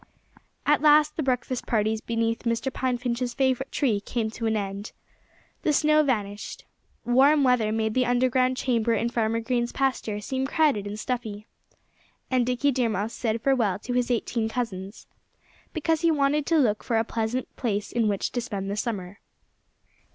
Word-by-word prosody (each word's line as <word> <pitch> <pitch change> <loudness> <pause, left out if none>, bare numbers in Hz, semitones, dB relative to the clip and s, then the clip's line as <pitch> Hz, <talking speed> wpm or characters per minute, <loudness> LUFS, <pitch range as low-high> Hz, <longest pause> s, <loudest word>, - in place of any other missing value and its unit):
At 295 -1 +3
last 300 0 +5
the - - -1
breakfast 255 -2 -1
parties 220 -1 +1
beneath 230 0 -1
Mr. 235 +3 -1
Pine 255 -1 0
Finch's 245 0 -2
favorite 265 -1 0
tree 235 -8 +1
came 220 +1 -3
to 225 0 -3
an 220 0 +1
end. 200 +1 -5 0.7
The 310 - +1
snow 305 +1 +4
vanished. 210 -8 -3 0.4
Warm 275 +5 +5
weather 250 -5 +3
made 220 0 0
the 255 0 +2
underground 255 +1 +2
chamber 235 -3 +1
in 230 +2 0
Farmer 230 -1 0
Green's 240 0 -1
pasture 255 -6 -1
seem 265 +5 -2
crowded 280 -10 +2
and 205 +1 -5
stuffy. 215 -4 -4 0.9
And 250 -2 +2
Dickie 250 +3 +2
Deer 245 -3 +1
Mouse 215 +2 -2
said 225 -1 -2
farewell 245 -8 +2
to 245 +4 -5
his 245 0 +1
eighteen 230 -1 -1
cousins, 205 -4 -5 0.7
because 320 0 0
he 335 - +3
wanted 290 -1 +1
to 330 - +3
look 220 -8 +2
for 230 - 0
a 225 - +3
pleasant 230 +2 -3
place 210 -4 -2
in 235 -2 +1
which 200 -2 -1
to 245 - -2
spend 200 -4 -4
the 205 - -3
summer. 200 -4 -4
240 Hz, 170 wpm, -26 LUFS, 220-260 Hz, 0.9 s, last